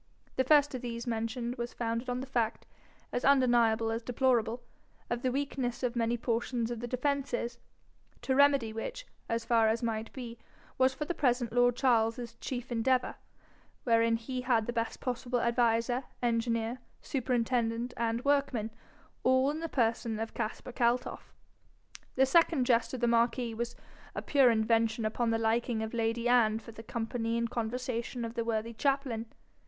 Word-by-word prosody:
The 260 Hz, -, +2 dB
first 290 Hz, +1 st, +4 dB
of 255 Hz, -, -4 dB
these 235 Hz, -1 st, -5 dB
mentioned 235 Hz, +1 st, -2 dB
was 240 Hz, 0 st, -5 dB
founded 230 Hz, +1 st, -2 dB
on 250 Hz, 0 st, -1 dB
the -, -, -5 dB
fact, 235 Hz, -4 st, -1 dB, 0.5 s
as 245 Hz, -, -2 dB
undeniable 235 Hz, -5 st, +4 dB
as 225 Hz, +1 st, -2 dB
deplorable, 240 Hz, -1 st, +1 dB, 0.5 s
of 240 Hz, 0 st, -1 dB
the 255 Hz, -, 0 dB
weakness 265 Hz, -2 st, -2 dB
of 250 Hz, -1 st, 0 dB
many 235 Hz, 0 st, +1 dB
portions 235 Hz, 0 st, -1 dB
of 240 Hz, -, -4 dB
the 240 Hz, -, -4 dB
defences, 255 Hz, -2 st, -2 dB, 0.6 s
to 265 Hz, -, +1 dB
remedy 275 Hz, -5 st, +4 dB
which, -, -, -5 dB, 0.2 s
as 230 Hz, 0 st, -1 dB
far 230 Hz, -2 st, +4 dB
as 225 Hz, +2 st, 0 dB
might 225 Hz, -1 st, -2 dB
be, 235 Hz, -3 st, -8 dB, 0.4 s
was 260 Hz, 0 st, +5 dB
for 300 Hz, -, -3 dB
the 350 Hz, -, -2 dB
present 245 Hz, -6 st, +1 dB
lord 245 Hz, 0 st, +4 dB
Charles's 235 Hz, -2 st, +1 dB
chief 250 Hz, -1 st, -5 dB
endeavour, 250 Hz, +2 st, +1 dB, 0.7 s
wherein 230 Hz, -1 st, +3 dB
he 250 Hz, +3 st, -4 dB
had 240 Hz, -3 st, +2 dB
the 240 Hz, -, -3 dB
best 230 Hz, 0 st, -2 dB
possible 245 Hz, 0 st, -1 dB
adviser, 235 Hz, +1 st, +1 dB, 0.2 s
engineer, 230 Hz, 0 st, 0 dB, 0.2 s
superintendent, 240 Hz, -2 st, 0 dB
and 230 Hz, +1 st, -1 dB
workman, 275 Hz, -6 st, +1 dB, 0.5 s
all 260 Hz, +2 st, +3 dB
in 305 Hz, -, -4 dB
the 330 Hz, 0 st, -4 dB
person 225 Hz, -3 st, 0 dB
of 225 Hz, 0 st, -4 dB
Caspar 230 Hz, +2 st, -4 dB
Kaltoff. 240 Hz, +1 st, -1 dB, 0.8 s
The 265 Hz, -, +5 dB
second 320 Hz, -2 st, +3 dB
jest 235 Hz, 0 st, +2 dB
of 255 Hz, -, -6 dB
the 240 Hz, -, +3 dB
marquis 235 Hz, 0 st, +2 dB
was 235 Hz, +1 st, -4 dB, 0.4 s
a -, -, -3 dB
pure 275 Hz, -4 st, +5 dB
invention 225 Hz, 0 st, +2 dB
upon 230 Hz, +2 st, 0 dB
the 225 Hz, -, +2 dB
liking 225 Hz, 0 st, 0 dB
of 220 Hz, -, -5 dB
lady 230 Hz, +1 st, 0 dB
Anne 230 Hz, -3 st, +4 dB
for 230 Hz, +1 st, -10 dB
the 225 Hz, -, -10 dB
company 230 Hz, 0 st, -2 dB
and 235 Hz, 0 st, -1 dB
conversation 235 Hz, +1 st, -3 dB
of 230 Hz, -, -6 dB
the 235 Hz, -1 st, -1 dB
worthy 230 Hz, 0 st, -2 dB
chaplain. 265 Hz, -3 st, -1 dB
235 Hz, 165 wpm, -31 LUFS, 230-255 Hz, 0.8 s, was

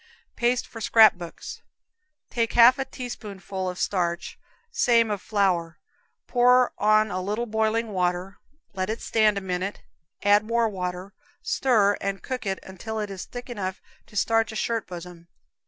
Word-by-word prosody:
Paste 240 Hz, +1 st, +1 dB
for 225 Hz, -, -10 dB
Scrap 220 Hz, 0 st, +7 dB
Books. 175 Hz, -2 st, -9 dB, 0.7 s
Take 230 Hz, -2 st, 0 dB
half 240 Hz, +3 st, +7 dB
a 270 Hz, -, -1 dB
teaspoonful 200 Hz, -7 st, -6 dB
of 180 Hz, -, -6 dB
starch, 175 Hz, -3 st, -2 dB, 0.3 s
same 230 Hz, -, +3 dB
of 205 Hz, -2 st, -2 dB
flour, 180 Hz, -6 st, 0 dB, 0.5 s
pour 250 Hz, 0 st, +4 dB
on 215 Hz, 0 st, +3 dB
a 185 Hz, +1 st, -2 dB
little 210 Hz, +5 st, -2 dB
boiling 220 Hz, 0 st, 0 dB
water, 180 Hz, 0 st, -2 dB, 0.3 s
let 185 Hz, 0 st, -2 dB
it 220 Hz, -, -2 dB
stand 215 Hz, -2 st, +2 dB
a -, -, -2 dB
minute, 185 Hz, +1 st, -4 dB, 0.4 s
add 205 Hz, +1 st, +5 dB
more 230 Hz, +1 st, +1 dB
water, 185 Hz, -1 st, -5 dB, 0.3 s
stir 210 Hz, -6 st, +2 dB
and 195 Hz, 0 st, -3 dB
cook 250 Hz, -5 st, -4 dB
it 190 Hz, 0 st, -1 dB
until 220 Hz, +4 st, -6 dB
it 210 Hz, -2 st, -4 dB
is 190 Hz, -1 st, -6 dB
thick 245 Hz, 0 st, -8 dB
enough 190 Hz, -6 st, -4 dB, 0.3 s
to -, -, -17 dB
starch 225 Hz, +1 st, +2 dB
a -, -, -8 dB
shirt 230 Hz, 0 st, -1 dB
bosom. 175 Hz, -1 st, -10 dB
210 Hz, 155 wpm, -25 LUFS, 185-230 Hz, 0.7 s, Scrap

